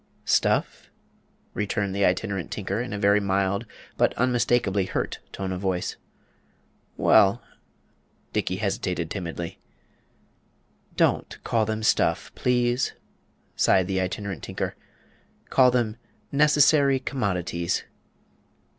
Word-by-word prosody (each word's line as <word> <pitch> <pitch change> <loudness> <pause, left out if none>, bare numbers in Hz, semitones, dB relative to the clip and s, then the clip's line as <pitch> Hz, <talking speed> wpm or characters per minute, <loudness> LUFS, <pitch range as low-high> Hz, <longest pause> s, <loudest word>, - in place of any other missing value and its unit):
"Stuff?" - - +1 0.6
returned 100 -1 -1
the 100 - +1
Itinerant 95 0 0
Tinker, 100 +1 -3
in 125 - -5
a 105 - -3
very 100 0 +4
mild, 100 +2 0 0.3
but - - +2
unmistakably 120 -5 +1
hurt - - -3
tone 95 -1 -4
of 90 0 -4
voice. 95 -2 -1 1.0
"Well - - +4 0.4
" - - -40
Dickey 90 - 0
hesitated 90 -4 -2
timidly. 85 -3 -5 1.4
"Don't - - +1
call 110 -2 +1
them 110 0 -2
stuff, - - +1
please," 125 0 +1 0.6
sighed 95 -1 +3
the 95 0 -1
Itinerant 95 0 -4
Tinker; - - -4 0.8
"call 130 -1 +6
them 120 -3 0 0.3
necessary 145 -1 +4
commodities." 90 -10 -2
100 Hz, 105 wpm, -25 LUFS, 95-120 Hz, 1.4 s, call